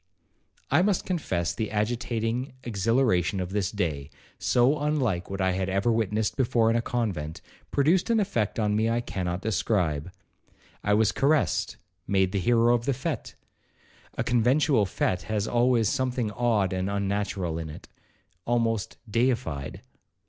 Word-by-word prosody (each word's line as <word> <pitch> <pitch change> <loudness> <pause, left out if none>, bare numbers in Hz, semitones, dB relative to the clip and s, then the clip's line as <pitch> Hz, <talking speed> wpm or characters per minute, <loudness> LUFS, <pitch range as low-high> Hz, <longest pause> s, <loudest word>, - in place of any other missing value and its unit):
'I 150 +5 +5
must 195 -1 +1
confess 95 - -1
the 110 - -3
agitating 115 +3 -2
exhilaration 100 - +1
of 90 0 -3
this 100 -2 0
day, 80 -9 -2 0.3
so 130 +5 +3
unlike 135 -12 0
what 95 0 -4
I 95 -1 +2
had 95 +1 -1
ever 100 +5 +1
witnessed 110 -1 0
before 115 -3 +2
in - - +1
a 115 - +2
convent, 95 -11 -3 0.3
produced 165 +8 +2
an 230 -1 +3
effect 115 - -1
on 105 -2 +1
me 110 +1 +2
I 115 +1 +1
cannot 90 -5 -3
describe. 90 -7 0 0.7
I 105 0 +3
was 110 -1 +3
caressed,—made 95 - 0
the 100 - 0
hero 120 +4 +3
of 120 -1 0
the 140 - +1
fete,—(a 140 -2 -8
conventual 125 -1 +3
fete 90 0 -1
has 105 -1 0
always 120 -2 +3
something 130 -5 -1
odd 105 -4 +1
and 95 +1 -1
unnatural 100 -4 -2
in 80 -1 -5
it),—almost 115 +8 -4
deified. 115 - -1
110 Hz, 140 wpm, -27 LUFS, 95-120 Hz, 0.7 s, I